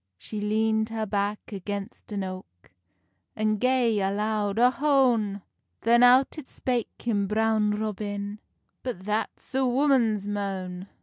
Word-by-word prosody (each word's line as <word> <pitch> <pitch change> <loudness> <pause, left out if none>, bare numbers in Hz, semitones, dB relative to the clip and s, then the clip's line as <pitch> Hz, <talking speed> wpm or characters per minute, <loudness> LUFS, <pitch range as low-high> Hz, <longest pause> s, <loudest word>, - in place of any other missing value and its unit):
She 210 - -6
leand 220 +1 +1
her 225 -1 -2
back 205 0 -1
against 200 +1 -6
an 200 -2 -2
oak, 185 - -9 0.6
And 215 -1 0
gae 250 -3 +2
a 195 -1 +1
loud 210 0 -1
Ohone! 245 -6 +3 0.4
Then 235 +1 +4
out 255 +5 +5
it 275 - -11
spake 245 -3 -3
him 205 -4 0
Brown 215 0 +2
Robin, 205 -1 -4 0.4
"But 225 -8 -5
that's 215 +5 -3
a 265 +1 +2
woman's 245 -6 +2
moan!" 190 -2 -4
215 Hz, 130 wpm, -26 LUFS, 200-235 Hz, 0.6 s, out